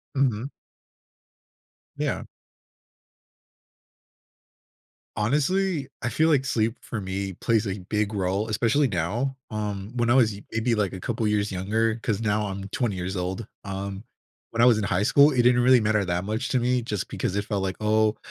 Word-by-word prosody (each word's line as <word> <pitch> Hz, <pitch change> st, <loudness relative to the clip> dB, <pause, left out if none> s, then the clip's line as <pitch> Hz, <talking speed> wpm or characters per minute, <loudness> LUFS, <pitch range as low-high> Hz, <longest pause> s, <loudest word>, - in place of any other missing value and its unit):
Mhm. 130 Hz, -1 st, +1 dB, 1.5 s
Yeah. -, -, -2 dB, 2.9 s
Honestly, 150 Hz, -, +1 dB
I 120 Hz, -, -1 dB
feel 160 Hz, +5 st, +2 dB
like 145 Hz, -5 st, +3 dB
sleep 115 Hz, -3 st, 0 dB
for 115 Hz, -, -5 dB
me 95 Hz, 0 st, -3 dB
plays 110 Hz, +4 st, +1 dB
a 95 Hz, +1 st, -3 dB
big 105 Hz, 0 st, 0 dB
role, 100 Hz, +2 st, -1 dB
especially 120 Hz, +6 st, +2 dB
now, 115 Hz, +10 st, -1 dB
um, 105 Hz, -1 st, -4 dB
when 120 Hz, -1 st, +1 dB
I -, -, +5 dB
was 120 Hz, -5 st, +4 dB
i 100 Hz, -, -11 dB
maybe, 115 Hz, +1 st, +1 dB
like, 100 Hz, -3 st, 0 dB
a 95 Hz, -, -7 dB
couple 115 Hz, +2 st, -2 dB
years 105 Hz, -1 st, 0 dB
younger, 110 Hz, +4 st, 0 dB
'cause 105 Hz, -3 st, 0 dB
now 105 Hz, -1 st, 0 dB
I'm 95 Hz, 0 st, -5 dB
20 110 Hz, -5 st, -1 dB
years 90 Hz, +2 st, -3 dB
old. 95 Hz, +4 st, -3 dB, 0.2 s
Um, 100 Hz, 0 st, -5 dB, 0.5 s
when 115 Hz, 0 st, 0 dB
I -, -, +7 dB
was 120 Hz, -3 st, +6 dB
in 110 Hz, -, -1 dB
high 100 Hz, -1 st, +1 dB
school, 140 Hz, +7 st, +6 dB
it 125 Hz, -3 st, +3 dB
didn't 125 Hz, 0 st, +5 dB
really 125 Hz, 0 st, +6 dB
matter 105 Hz, -1 st, +2 dB
that 90 Hz, 0 st, -2 dB
much 110 Hz, +5 st, -2 dB
to 130 Hz, -, +2 dB
me 125 Hz, +1 st, +1 dB
just 105 Hz, -5 st, -3 dB
because 95 Hz, -, -3 dB
it 100 Hz, -, -1 dB
felt 100 Hz, -3 st, -2 dB
like, 95 Hz, -1 st, -2 dB
"Oh, 110 Hz, 0 st, +2 dB
110 Hz, 175 wpm, -25 LUFS, 100-120 Hz, 2.9 s, I